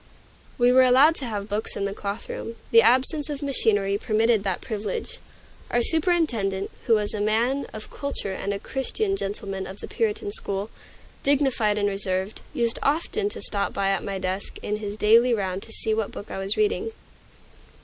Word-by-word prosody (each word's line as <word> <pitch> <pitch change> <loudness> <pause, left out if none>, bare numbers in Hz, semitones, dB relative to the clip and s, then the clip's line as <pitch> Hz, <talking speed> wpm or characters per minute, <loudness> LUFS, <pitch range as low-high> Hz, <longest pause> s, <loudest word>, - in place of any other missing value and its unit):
We 245 0 +5
were 260 +1 +7
allowed 260 +5 +6
to 270 - -3
have 205 -3 -4
books 210 +1 -2
in 200 - -1
the 200 - -2
cloth 200 +1 -5
room. 230 - -6 0.2
The 230 - +8
absence 260 +6 +3
of 290 -1 -4
machinery 205 -7 +2
permitted 220 -1 +2
that 190 -3 -1
privilege. 215 -3 -4 0.5
Our 240 - +2
superintendent, 250 - +1 0.2
who 230 - +6
was 210 -1 0
a 210 - -2
man 235 +6 +1
of 215 0 -8
culture 280 -9 -3
and 200 - -3
a 200 - -1
Christian 390 - -2
gentleman 195 - -4
of 190 +2 -8
the - - -7
Puritan 425 -2 -1
school, 205 - -3 0.5
dignified 265 -7 +2
and 205 -1 +2
reserved, 195 0 -2
used 235 -1 +1
often 340 +8 0
to - - -5
stop 200 -1 -2
at 195 0 +1
my 195 -1 -3
desk 190 +1 -3
in 210 - -1
his 205 -1 -5
daily 230 +3 +5
round 190 -2 -2
to 225 - -7
see 220 0 0
what 220 -2 -1
book 205 - -9
I - - -4
was 195 +1 -1
reading. 430 +1 +1
220 Hz, 180 wpm, -25 LUFS, 200-265 Hz, 0.5 s, The